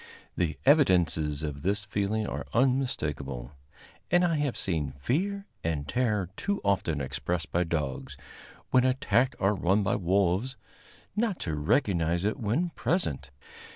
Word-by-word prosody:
The 80 -5 -1
evidences 85 - +3
of 70 -2 -4
this 100 +4 0
feeling 105 +2 -1
are - - -4
unmistakable, 75 - 0 0.6
and 175 +1 +4
I 165 -2 +1
have 145 -4 -1
seen 75 -7 -1
fear 195 - -1 0.2
and 75 -3 -2
terror 105 - 0
too 200 0 -1
often 90 -6 +1
expressed 75 +5 -3
by 90 +1 +1
dogs, 75 -6 -3 0.5
when 125 - +5
attacked 130 -1 +2
or 100 +1 +2
run 95 +2 +2
by - - +1
wolves, 95 +6 +1 0.6
not 215 -3 0
to 80 - -2
recognize 85 - +1
it 110 +6 0
when 130 +11 0
present. 75 - -1
100 Hz, 135 wpm, -28 LUFS, 80-130 Hz, 0.6 s, when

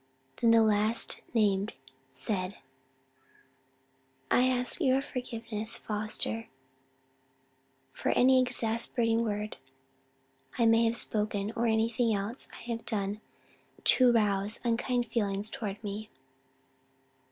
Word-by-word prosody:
Then 230 - +2
the 230 0 +6
last 215 +1 +2
named 205 -3 +1 0.4
said, 185 - -3 1.7
"I 250 - +4
ask 250 +6 +2
your 265 -3 +3
forgiveness, 230 -4 -2
Foster, 215 +1 -2 1.5
for - - -3
any 260 +1 +5
exasperating 230 -1 +1
word 210 -1 -3 1.0
I 235 - +3
may 225 +1 +4
have 230 +1 +1
spoken, 210 -2 -1
or 235 0 0
anything 225 +1 +1
else 205 +6 -4
I - - -12
have 230 0 -4
done 205 -1 -3 0.6
to 255 -2 +5
rouse 210 -2 +1
unkind 240 +1 0
feelings 210 -2 -1
toward 215 -5 -6
me." 210 +1 -6
225 Hz, 105 wpm, -29 LUFS, 210-235 Hz, 1.7 s, the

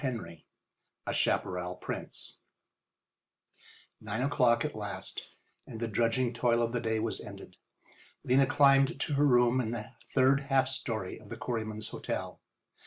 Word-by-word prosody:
XVIII 100 - -4 0.6
A - - -2
CHAPARRAL 90 0 0
PRINCE - - -6 1.6
Nine 110 +3 -2
o'clock 125 -3 +3
at 150 - -3
last, 100 -3 -5 0.4
and 110 - -7
the 115 - -1
drudging 115 +3 +1
toil 120 0 +2
of 115 - 0
the 120 -1 -1
day 110 -1 0
was 110 0 -2
ended. - - -10 0.7
Lena 135 +2 +4
climbed 135 -1 +4
to 150 - -1
her 145 +1 +4
room 125 0 +4
in 110 - -2
the 115 -2 -5 0.2
third 135 +1 +4
half 135 -1 +4
story 115 -8 -3
of 110 -2 -15
the 115 - -6
Quarrymen's 110 -2 -3
Hotel. - - -4
120 Hz, 145 wpm, -31 LUFS, 110-130 Hz, 1.6 s, Lena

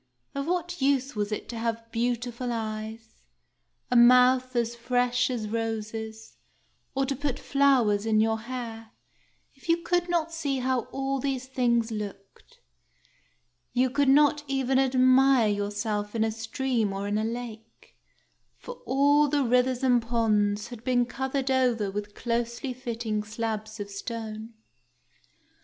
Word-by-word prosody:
Of 280 +1 -3
what 350 -1 -2
use 270 -1 +1
was 205 0 -2
it 210 - -4
to 235 - -5
have 230 0 -3
beautiful 240 +1 -2
eyes, 220 0 -5 0.7
a - - +2
mouth 250 +1 +6
as 235 0 0
fresh 245 +1 +1
as 235 -4 -3
roses, 220 0 -4 0.6
or 270 0 +1
to 275 +1 -2
put 280 -1 -2
flowers 245 -7 +2
in 215 -1 +3
your 220 0 +2
hair, 230 -2 -7 0.6
if 270 +4 -16
you 335 - +5
could 350 0 0
not 335 -1 0
see 285 -5 -1
how 255 -1 0
all 270 0 -2
these 265 -1 -2
things 240 -3 +1
looked? 210 - -8 1.1
You 255 0 +2
could 280 0 +2
not 295 +1 +4
even 265 -1 +1
admire 255 -2 +4
yourself 205 +1 -2
in 220 - +2
a 220 - 0
stream 225 -1 -1
or 195 +1 -3
in 205 +1 0
a - - -1
lake, 225 -1 -7 0.6
for - - -10
all 285 +3 +4
the 290 0 +1
rivers 250 +1 +2
and 245 -2 +4
ponds 215 -3 +1
had 240 -3 -10
been 245 -1 +2
covered 265 +2 -2
over 240 -6 +1
with 205 +1 -5
closely 235 +2 -2
fitting 230 -3 -3
slabs 220 0 -4
of 200 0 -6
stone. 220 +1 -6
240 Hz, 145 wpm, -27 LUFS, 220-265 Hz, 1.1 s, mouth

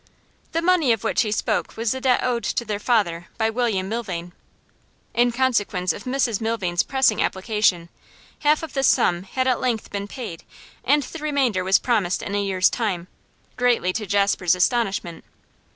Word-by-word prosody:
The 330 +1 0
money 340 -7 +3
of 225 - -4
which - - +1
he 215 -3 -1
spoke 210 - -1
was 225 -1 0
the 260 - -3
debt 255 -1 +3
owed 240 -2 0
to 235 - -1
their 210 -2 -3
father 200 -7 0
by 225 -1 +1
William 220 -5 0
Milvain. 185 -6 -4 0.8
In 240 +1 +3
consequence 210 -8 0
of - - -10
Mrs 255 -5 0
Milvain's 200 -6 0
pressing 265 -5 +2
application, 190 -3 +1 0.5
half 300 +1 +2
of 320 - -7
this 270 -1 +2
sum 175 0 +3
had 255 +7 -2
at 255 -2 +1
length 240 -4 -2
been 200 0 -4
paid 210 -8 -7 0.4
and 290 +2 +3
the 330 - -8
remainder 275 -10 0
was 190 +1 +4
promised 210 -7 0
in 200 - -5
a 205 0 0
year's 190 -1 +2
time, 185 -7 -2 0.5
greatly 240 -7 +2
to 215 0 -4
Jasper's 195 -2 +2
astonishment. 190 -4 0
220 Hz, 170 wpm, -23 LUFS, 190-250 Hz, 0.8 s, was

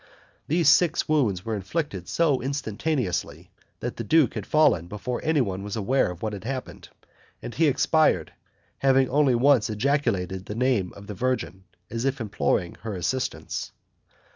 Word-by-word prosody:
These 165 0 +2
six 160 +2 +4
wounds 120 -12 +1
were 115 - -2
inflicted 100 - -3
so 150 -6 +1
instantaneously, 135 - -2 0.3
that - - -4
the - - -3
duke 155 -6 +3
had - - -5
fallen 150 - +3
before 105 +6 -4
anyone 125 -12 0
was 105 +1 -5
aware 120 +4 +1
of 90 +2 -8
what 110 -1 -2
had 100 -2 -7
happened, 130 +1 -6 0.5
and 120 - -7
he 160 0 +3
expired, 155 +3 +2 0.5
having 135 -1 +4
only 140 -2 +3
once 125 -2 +4
ejaculated 105 -6 -1
the 105 - -5
name 120 -6 +1
of 100 - -12
the 105 - -6
Virgin, 100 -5 -2 0.3
as 115 0 -3
if 135 0 0
imploring 100 -5 -1
her 110 -2 -5
assistance. 125 +9 -3
125 Hz, 155 wpm, -25 LUFS, 100-140 Hz, 0.5 s, six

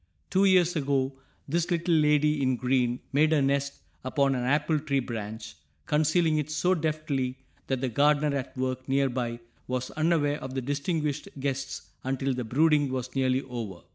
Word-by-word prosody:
Two 190 +1 +4
years 180 -2 +4
ago 135 -2 0 0.3
this 170 +4 0
"little 170 0 +1
lady 150 -1 +3
in 130 -1 +2
green" 125 -1 0
made 155 +3 +4
her 155 - +4
nest 140 +1 -1 0.2
upon 135 +1 +1
an 125 -1 -1
apple 150 +3 +2
tree 140 -2 0
branch, 110 - -6 0.3
concealing 155 +1 +2
it 150 0 -3
so 180 +4 +2
deftly 150 -6 -1 0.3
that 130 -2 -1
the 135 - 0
gardener 145 +3 +3
at 135 -1 -5
work 130 0 -3
near 135 0 +2
by 120 -2 -3 0.3
was 125 0 -3
unaware 155 -2 +1
of 130 0 -6
the 130 - -1
distinguished 145 +2 -2
guests 135 0 -4
until 135 +1 -1
the 125 0 -3
brooding 145 +3 +3
was 130 -1 -4
nearly 130 0 +1
over. 115 -9 -6
140 Hz, 170 wpm, -27 LUFS, 130-155 Hz, 0.3 s, Two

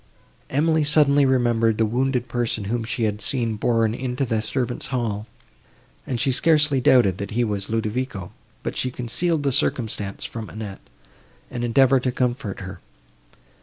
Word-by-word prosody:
Emily 160 +3 +2
suddenly 145 -2 +4
remembered 120 -4 +2
the 115 - +3
wounded 125 +2 0
person, 120 -3 -1
whom 115 +4 -2
she 115 +1 -3
had 105 -1 -1
seen 120 -6 0
borne 115 0 +1
into 125 +2 -2
the 110 -3 0
servants' 120 +3 -3
hall, 115 -4 -2 0.8
and 125 - -2
she 135 - +2
scarcely 150 -1 +3
doubted, 110 -8 +4
that 100 -1 -4
he 120 - +3
was 100 -3 -2
Ludovico, 110 -3 -2 0.3
but - - -3
she 130 - 0
concealed 145 +7 -1
the 140 - +1
circumstance 110 -7 -1
from 115 -2 -6
Annette, 105 -3 -7 0.7
and 120 -1 -4
endeavoured 130 +2 +4
to 125 - 0
comfort 120 -6 -2
her. 95 -1 -8
120 Hz, 155 wpm, -23 LUFS, 110-130 Hz, 0.8 s, suddenly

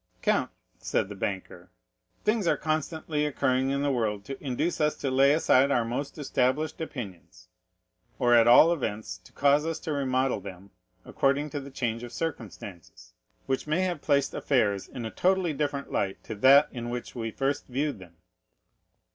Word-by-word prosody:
"Count," - - +2 0.3
said 95 - -1
the 105 - -7
banker, 95 0 -5 0.5
"things 210 -3 +1
are - - +3
constantly 155 -1 -2
occurring 130 -2 +1
in 140 +1 0
the 145 - +1
world 105 -5 -1
to 135 +1 -8
induce 140 +6 -1
us 150 0 +2
to 135 - -3
lay 135 +2 +5
aside 140 -3 +4
our 120 -4 +2
most 135 +6 -4
established 145 +2 0
opinions, 90 - -8 0.7
or 120 -2 +3
at 115 -1 +6
all 155 +8 +7
events 105 - -4
to 90 - -19
cause 145 +1 +3
us 165 0 -2
to 160 - -4
remodel 130 -3 0
them 95 0 -11 0.3
according 140 +2 0
to 145 - -3
the 140 0 -9
change 115 -4 -3
of 120 -1 -8
circumstances, 105 - -7 0.3
which 135 +2 -2
may 155 +4 +1
have 180 -5 -1
placed 140 -2 +1
affairs 105 -8 0
in 120 -3 -7
a 110 - -5
totally 185 -3 +1
different 145 -1 -3
light 95 -1 -1
to - - -6
that 135 +7 +6
in 120 -2 -5
which 120 0 -5
we 115 -2 -4
at - - -15
first 140 +1 -1
viewed 140 -1 -2
them." 90 -2 -14
135 Hz, 175 wpm, -27 LUFS, 115-150 Hz, 0.7 s, all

